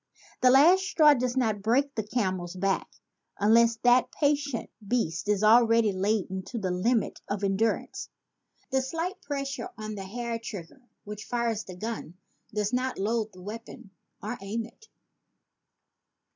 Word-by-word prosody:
The 255 - +6
last 315 +9 +6
straw 315 -5 +5
does 255 -1 -1
not 220 -5 +1
break 265 +7 +2
the 220 - -1
camel's 185 -5 -2
back 195 +1 0 0.5
unless 230 +3 +5
that 245 +1 +4
patient 285 -4 0 0.2
beast 205 -6 -1
is 210 0 +2
already 230 0 +5
laden 190 0 -1
to 245 - -6
the 190 -4 -2
limit 220 +6 0
of 205 0 -2
endurance. 200 +3 -1 0.6
The 265 0 +2
slight 330 +8 -4
pressure 275 -4 -4
on 215 0 -5
the 195 -2 -6
hair 235 +3 -4
trigger 205 0 -8 0.2
which 210 0 -8
fires 235 -3 -1
the 185 - -9
gun, 215 -4 -5 0.4
did 210 0 -1
not 255 +1 -1
load 220 +2 -1
the 185 -1 -14
weapon 210 -1 -9 0.3
or 225 +4 -4
aim 220 +3 -3
it. 445 - -17
225 Hz, 145 wpm, -28 LUFS, 200-250 Hz, 0.6 s, The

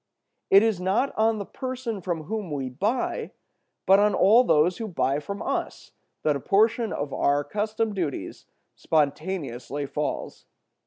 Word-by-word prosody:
It 195 +2 +7
is 220 -5 +1
not 195 +9 0
on 220 0 +2
the 200 - -4
person 255 -5 -5
from 170 -3 -3
whom 210 +1 -4
we 135 -3 -3
buy, 215 - -2 0.5
but 195 +1 +6
on 210 -1 +3
all 225 +6 +6
those 175 -4 +3
who 225 - -3
buy 140 -6 0
from 200 +7 -6
us, - - -4 0.3
that 150 -2 +2
a - - -2
portion 220 - +2
of 145 -1 -4
our 145 +1 +2
custom 215 +4 -2
duties 150 - -4 0.3
spontaneously 145 -3 -1
falls. 150 +2 -4
190 Hz, 150 wpm, -25 LUFS, 150-220 Hz, 0.5 s, It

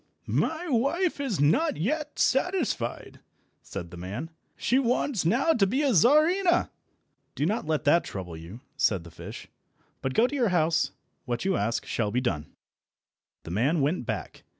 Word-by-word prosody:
"My 325 +2 -1
wife 290 +7 +1
is 265 - -2
not 280 - +3
yet 300 - -2
satisfied," 270 - 0 0.4
said 85 -4 -7
the 90 - -9
man; 105 - -6 0.3
"she 255 - +2
wants 250 - 0
now 260 - +3
to 200 -8 +3
be 260 +9 0
a 275 -4 +3
Czarina." 315 - +4 0.6
"Do 145 - 0
not 205 -2 -1
let 155 -2 0
that 160 +4 +4
trouble 90 -4 -6
you," 85 +9 -10
said 100 - +1
the 85 - -12
fish, - - -9 0.5
"but 130 -1 -2
go 230 - +5
to 255 - -2
your 245 -6 +2
house. 165 -2 +2 0.4
What 120 +2 -3
you 190 -1 +2
ask 115 +3 -1
shall 105 -3 -1
be 120 +4 0
done." 80 - -2 1.0
The 80 - -7
man 130 - +1
went 140 -2 0
back. - - -4
175 Hz, 165 wpm, -27 LUFS, -, 1.0 s, go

